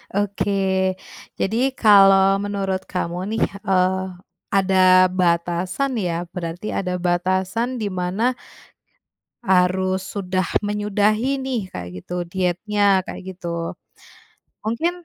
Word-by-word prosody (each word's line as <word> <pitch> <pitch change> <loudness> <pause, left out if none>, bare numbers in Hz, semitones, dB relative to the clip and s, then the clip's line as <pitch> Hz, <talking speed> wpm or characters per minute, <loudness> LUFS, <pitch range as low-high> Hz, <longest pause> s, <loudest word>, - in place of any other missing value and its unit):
Oke. 195 -2 0 0.4
Jadi 215 +4 -1 0.2
kalau 195 -3 +6
menurut 200 -2 -2
kamu 180 0 -3
nih, - - +1 0.2
eee, 190 0 +2 0.5
ada 185 -1 +5
batasan 180 +8 0
ya 175 -3 -2
berarti, 175 +2 -5
ada 180 -2 -2
batasan 185 +7 0
di 215 -4 -3
mana 185 +7 0 1.1
harus 185 -1 +2
sudah 185 -2 -2 0.2
menyudahi 210 +4 +1
nih, 260 -3 -1
kayak 90 -1 -6
gitu, - - -8 0.2
dietnya 190 +2 +1
kayak - - -8
gitu. 170 -2 -4 0.9
Mungkin 335 +11 -2
190 Hz, 100 wpm, -21 LUFS, 180-205 Hz, 1.1 s, kalau